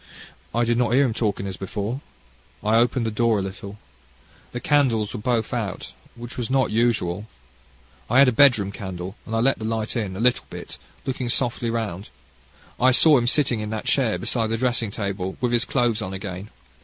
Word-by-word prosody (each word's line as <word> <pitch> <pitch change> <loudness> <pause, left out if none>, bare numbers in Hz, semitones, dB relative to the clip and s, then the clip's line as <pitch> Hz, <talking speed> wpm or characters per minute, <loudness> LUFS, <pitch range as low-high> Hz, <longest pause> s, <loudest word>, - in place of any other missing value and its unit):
I 120 +2 +1
did 120 0 +1
not 120 -2 +1
hear 140 +2 +5
him 120 - -1
talking 105 -3 -1
as 95 -1 -5
before. 105 +7 -4 0.6
I 110 +2 +3
opened 120 +1 +2
the 110 - -1
door 115 0 +2
a - - 0
little. 100 +1 -7 0.7
The 120 - -4
candles 120 -8 +2
were 120 - -4
both 120 +1 0
out, 110 -6 -4 0.2
which 120 0 -9
was 120 -3 -3
not 130 0 +2
usual. 110 -4 0 0.8
I 120 - +3
had 140 0 +8
a - - +4
bedroom 115 -6 +4
candle, 95 -1 -6
and 115 - -3
I - - +2
let 135 +2 +2
the 110 - -5
light 110 -1 -2
in, 105 -5 -2
a - - -6
little 125 +2 +2
bit, - - -8 0.3
looking 130 -2 -3
softly 120 -1 0
round. 110 -5 -3 0.7
I 130 - +5
saw 150 +4 +6
him 120 - -1
sitting 125 -4 +2
in 105 0 -4
that 110 -1 -4
chair 125 -6 +2
beside 115 -3 0
the 115 +1 -1
dressing 120 -2 0
table 100 -2 -4
with 125 -1 0
his 120 0 +2
clothes 120 -4 +1
on 95 -2 -4
again. 95 0 -6
115 Hz, 200 wpm, -23 LUFS, 105-125 Hz, 0.8 s, had